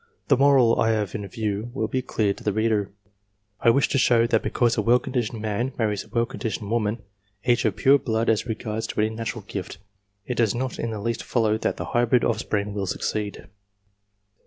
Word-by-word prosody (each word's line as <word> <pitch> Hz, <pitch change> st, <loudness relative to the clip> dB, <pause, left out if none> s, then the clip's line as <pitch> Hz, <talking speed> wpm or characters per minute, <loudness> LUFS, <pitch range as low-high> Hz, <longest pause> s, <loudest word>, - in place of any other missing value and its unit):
//The 140 Hz, -, +5 dB
moral 135 Hz, -5 st, +5 dB
I 115 Hz, -, +3 dB
have 105 Hz, -3 st, -2 dB
in 105 Hz, -2 st, -4 dB
view 110 Hz, +1 st, -3 dB
will 110 Hz, -4 st, 0 dB
be 130 Hz, +3 st, -1 dB
clear 105 Hz, -5 st, 0 dB
to -, -, -14 dB
the 105 Hz, -, +1 dB
reader. 110 Hz, -1 st, +1 dB, 0.7 s
I -, -, -1 dB
/wish 140 Hz, +4 st, +4 dB
to 135 Hz, -, +1 dB
show 120 Hz, -3 st, +4 dB
that 115 Hz, -2 st, +2 dB
because 120 Hz, -2 st, +1 dB
a -, -, +1 dB
well 120 Hz, +1 st, +4 dB
conditioned 120 Hz, -4 st, -3 dB
man 110 Hz, +5 st, -1 dB
marries 105 Hz, -4 st, 0 dB
/a -, -, -21 dB
well 115 Hz, -1 st, +2 dB
conditioned 110 Hz, -2 st, -5 dB
woman, 110 Hz, -1 st, -1 dB, 0.4 s
each 120 Hz, 0 st, +2 dB
of 105 Hz, -3 st, +1 dB
pure 135 Hz, +6 st, +5 dB
blood 115 Hz, -2 st, -1 dB
as 110 Hz, +1 st, +1 dB
regards 110 Hz, -1 st, -3 dB
] -, -, -22 dB
any 110 Hz, +1 st, +2 dB
natural 115 Hz, -1 st, -5 dB
gift, 95 Hz, -1 st, -6 dB, 0.5 s
it 125 Hz, -, -2 dB
does 115 Hz, -3 st, +2 dB
not 130 Hz, 0 st, -3 dB
in 115 Hz, -, -2 dB
the 110 Hz, -2 st, -4 dB
least 115 Hz, +3 st, -2 dB
follow 110 Hz, -3 st, +1 dB
that -, -, -1 dB
the -, -, -4 dB
I -, -, -9 dB
hybrid 120 Hz, 0 st, +3 dB
offspring 105 Hz, -2 st, -1 dB
will 100 Hz, -2 st, -3 dB
succeed. 105 Hz, +2 st, -3 dB
110 Hz, 210 wpm, -24 LUFS, 105-120 Hz, 0.7 s, The